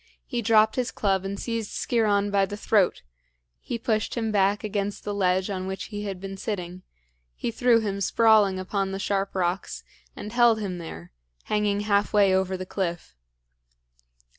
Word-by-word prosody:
He 240 -3 -3
dropped 220 0 +4
his 250 0 0
club 195 -2 0
and 195 +1 -4
seized 230 -3 -3
Sciron 205 -4 +1
by 195 -1 +2
the 205 - -6
throat; 205 - +2 0.6
he 235 - -4
pushed 220 -2 -1
him 225 -2 -1
back 200 +1 +2
against 205 -1 -3
the 205 - -3
ledge 185 -1 +1
on 185 -1 -3
which 190 0 -5
he 205 0 -4
had 195 -2 -4
been 195 0 -7
sitting; 185 -3 -5 0.5
he - - -3
threw 235 0 +3
him 200 -2 -3
sprawling 215 -3 +4
upon 195 +1 -2
the - - -2
sharp 195 0 -2
rocks, 180 0 -2 0.3
and 210 - -7
held 240 -2 +4
him 185 -4 -4
there, 85 - -9 0.3
hanging 210 -1 0
half 205 -1 +1
way 200 -2 +5
over 190 0 +1
the 185 - -6
cliff. 175 - -4
200 Hz, 170 wpm, -25 LUFS, 190-215 Hz, 0.6 s, way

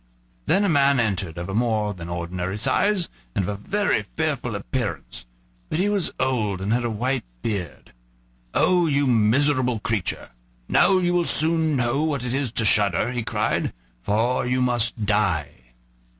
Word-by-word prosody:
Then 200 - +3
a - - +2
man 140 -4 +3
entered, 95 -7 -1
of 90 +3 -4
more 110 -3 0
than 85 -3 -9
ordinary 90 +3 -4
size 190 - +1 0.3
and 100 - +1
of - - -4
a - - -1
very 205 - +1 0.2
fearful 145 -8 -1
appearance; 85 - -4 0.4
but - - -2
he 195 +4 +1
was 200 -5 +1
old 110 -7 0
and 100 +3 -1
had 120 +1 +1
a 120 - -1
white 125 +4 -1 0.2
beard. 95 -8 -5 0.6
"Oh! 180 -2 +3
you 145 -1 +2
miserable 125 +1 +2
creature, 110 -4 -2 0.4
now 190 - +4
you 175 -1 +1
will 175 -1 +2
soon 160 -1 +3
know 125 +2 0
what 145 -5 -1
it 125 - -2
is 135 -4 -1
to 115 - 0
shudder," 105 +3 +3
he 125 -1 -2
cried, - - -1 0.3
"for 115 - 0
you 125 +1 +1
must 120 -3 0
die." 100 -9 +1
120 Hz, 165 wpm, -23 LUFS, 105-145 Hz, 0.6 s, now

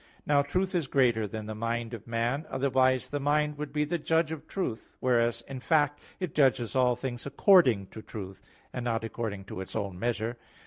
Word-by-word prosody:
Now 145 -1 +4
truth 185 +7 -1
is 170 -6 0
greater 120 -6 +2
than 110 +2 -6
the 110 - -5
mind 115 +1 -2
of 115 -2 -8
man; 120 +6 -1
otherwise 130 -1 +2
the 145 - -2
mind 150 +1 +1
would 150 -2 -4
be 150 0 +1
the 170 +3 -2
judge 160 +1 +1
of 160 -1 -6
truth: 155 - -4
whereas 120 -2 +2
in 135 -1 -6
fact 145 +1 +2 0.2
it 180 -6 -3
judges 130 -5 +2
all 125 -1 +4
things 125 0 -5
according 140 - +5
to 110 - -9
truth, 95 -3 -8 0.3
and 125 - -3
not 115 -1 -1
according 110 -4 -4
to 95 - -6
its 95 - -8
own 100 -4 -3
measure. 115 +1 -1
125 Hz, 195 wpm, -29 LUFS, 115-145 Hz, 0.3 s, according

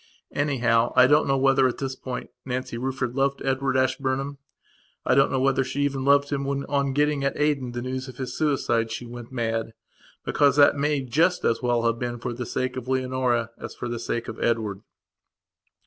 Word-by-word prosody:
Anyhow, 120 -5 +1
I 125 - +8
don't 150 +3 +4
know 135 0 +2
whether, 135 0 +4
at 125 - -3
this 135 -1 -3
point, 130 -1 -6
Nancy 130 -1 -4
Rufford 125 0 -2
loved 140 +1 0
Edward 135 0 0
Ashburnham. 135 +1 -1 0.7
I - - +3
don't 135 +1 +4
know 130 - +1
whether 135 0 +2
she 135 +2 -3
even 140 -2 0
loved 140 +1 +3
him 140 -1 -1
when, 140 0 -2
on 140 -1 0
getting, 145 0 +1
at 140 - -1
Aden, 140 -5 0
the 120 0 -4
news 130 +1 -4
of 130 - -10
his 125 -1 -5
suicide 125 -6 +1
she 115 +2 -5
went 120 0 -9
mad. 115 -2 -2 0.5
Because 140 -2 +3
that 145 -1 +6
may 145 0 0
just 160 +8 +1
as 115 - +1
well 120 -2 +1
have 115 0 +1
been 120 -1 -3
for 120 +1 -4
the 120 0 -5
sake 130 0 -2
of 125 -1 -6
Leonora 130 -3 0
as - - -7
for - - -5
the 120 -1 -4
sake 120 0 -3
of 110 - -5
Edward. 110 -4 0
130 Hz, 200 wpm, -25 LUFS, 120-140 Hz, 0.7 s, I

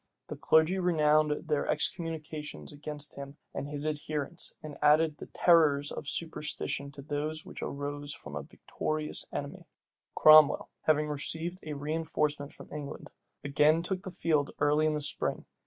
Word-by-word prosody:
The - - -4
clergy 160 +4 +3
renewed 155 -3 +2
their 150 -2 0
excommunications 155 - -3
against 145 0 -6
him 140 +1 -8 0.2
and - - -4
his 145 0 -4
adherents, 155 +1 -3
and 150 -2 -8
added 150 +1 +4
the - - -9
terrors 150 -5 +4
of - - -6
superstition 150 -3 -3
to 140 - -10
those 150 +2 -3
which - - -9
arose 145 0 -4
from 75 - -8
a 75 - -3
victorious 155 - -4
enemy. - - -6 0.5
Cromwell, 155 -1 +7 0.2
having 150 -1 +3
received 160 +4 -3
a 155 -1 -5
reënforcement 150 -1 -1
from - - -13
England, 145 -2 -7 0.3
again 150 +3 +3
took 185 +1 -2
the 190 - -6
field 155 -5 +1
early 150 +1 +3
in 155 - +1
the 150 - -2
spring. 145 - -1
150 Hz, 150 wpm, -30 LUFS, 145-155 Hz, 0.5 s, Cromwell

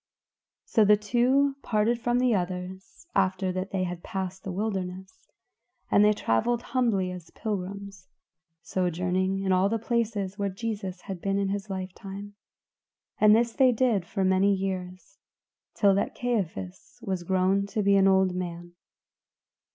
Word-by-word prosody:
So 220 - +3
the 210 0 +6
two 255 +6 +2
parted 225 +1 +1
from 240 +1 +1
the 250 -1 +3
others 185 - -4
after 190 -1 +1
that 185 +1 -3
they 190 -1 -1
had 180 -1 -4
passed 190 -2 -5
the 195 - -4
wilderness, 190 -2 -4 0.6
and 205 - +6
they 210 - +6
traveled 220 - 0
humbly 230 -8 0
as 180 -3 -9
pilgrims; 200 -2 -5 0.6
sojourning 180 +1 0
long 195 - -3
in 190 - +1
all 185 +2 +3
the 225 - 0
places 220 -4 -2
where 200 0 0
Jesus 195 -2 -5
had 190 -4 -7
been 195 0 0
in 200 -1 0
his 200 +1 -3
life 190 -1 -4
time; 200 +1 -8 0.9
and 215 0 +7
this 230 0 +2
did 255 -4 +4
they 235 -6 +3
for 185 +3 -3
many 190 +1 +3
years, 185 0 -5 0.6
till 200 -2 +4
that 200 - -1
Caiaphas 165 - -3
was 190 -5 -2
grown 190 +2 +1
to 210 +1 -2
be 200 0 +4
an 195 0 +5
old 190 -1 +4
man. 175 -1 -5
195 Hz, 155 wpm, -27 LUFS, 185-215 Hz, 0.9 s, and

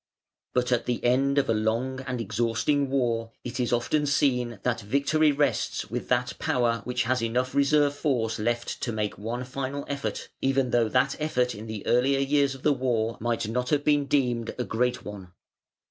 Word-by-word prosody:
But 125 0 +1
at 120 -1 +1
the 120 -1 -1
end 135 +3 +2
of 140 - +3
a 115 - +2
long 115 +5 -1
and 125 -1 -2
exhausting 120 +6 0
war 115 -4 0
it 125 +2 -5
is 120 -2 0
often 145 +5 +1
seen 125 -5 +1
that 120 -2 0
victory 140 +7 +2
rests 140 -5 -1
with - - -4
that - - +1
power 120 -3 +1
which 125 +1 0
has 125 +1 0
enough 125 +3 -1
reserve 145 +1 +3
force 125 -7 -1
left 120 +2 -2
to 120 - -1
make 105 -2 -3
one 115 +4 -3
final 135 +2 -4
effort, 140 -1 -4
even 135 -2 +1
though 115 -2 +3
that 130 +4 +2
effort 125 -5 +1
in 105 +2 -8
the 110 -2 -6
earlier 130 +3 +3
years 140 0 +2
of 135 - -14
the 150 - +4
war 120 -4 0
might 115 -1 -1
not 125 +3 -1
have 145 -1 +2
been 145 -1 +3
deemed 125 -5 0
a 125 - -1
great 120 +3 -1
one. 95 -4 -9
125 Hz, 190 wpm, -27 LUFS, 115-140 Hz, -, the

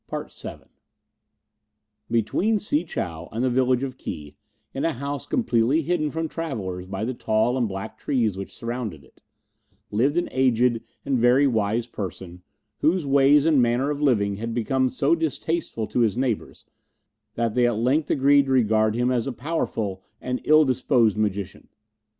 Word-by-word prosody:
CHAPTER - - -6
VII - - -26 1.4
Between 180 - +1
Si 175 -6 -1
chow 85 - -5
and 115 +3 -2
the 130 - +1
village 130 0 +2
of 130 -1 -5
Ki, 75 -1 -7 0.4
in 135 - -3
a 165 - +1
house 140 +1 -5
completely 140 - +1
hidden 160 -2 0
from 160 +2 -3
travellers 100 - -5
by 95 +3 -3
the 130 - -2
tall 110 +1 +1
and 125 -3 +1
black 100 +2 -7
trees 115 -8 0
which 95 0 -7
surrounded 115 - -5
it, - - -24 0.7
lived 135 +9 +1
an 175 - +1
aged 125 -2 +2 0.2
and 135 -3 +1
very 125 +4 +5
wise 110 -2 +1
person 95 -5 -7 0.4
whose 165 +2 +2
ways 140 +1 +5
and 155 -5 +4
manner 120 +4 +1
of 145 0 -4
living 100 -8 +2
had 115 +2 -4
become 130 +2 +1
so 140 +5 +1
distasteful 160 -6 -2
to 125 - -2
his 115 -2 +2
neighbours 125 -4 -2 0.7
that 115 -2 0
they 125 0 +3
at 120 -3 0
length 130 +7 +1
agreed 140 0 +4
to - - -1
regard 110 -3 +3
him 125 +1 +1
as 120 -1 0
a - - -1
powerful 115 - -3 0.2
and 125 0 -3
ill 155 0 +6
disposed 125 -4 +2
magician. 100 -3 -3
125 Hz, 165 wpm, -24 LUFS, 110-140 Hz, 1.4 s, ill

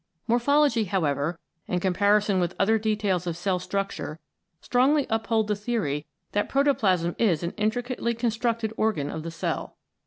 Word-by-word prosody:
Morphology, 245 +1 +3
however, 160 -4 0 0.3
and 180 - 0
comparison 200 +2 +2
with 175 0 -1
other 220 +3 +3
details 205 -4 0
of 170 -1 -2
cell 180 +1 0
structure 195 -4 -3 0.4
strongly 265 - +2
uphold 225 -1 +1
the 210 - +1
theory 200 - -2 0.2
that 205 - 0
protoplasm 200 -12 +2
is 180 -8 +2
an 170 - -1
intricately 235 +2 -1
con 230 0 0
structed 225 -1 -1
organ 205 -11 0
of 160 - -5
the 165 - -5
cell. 165 - -4
210 Hz, 150 wpm, -26 LUFS, 180-230 Hz, 0.4 s, Morphology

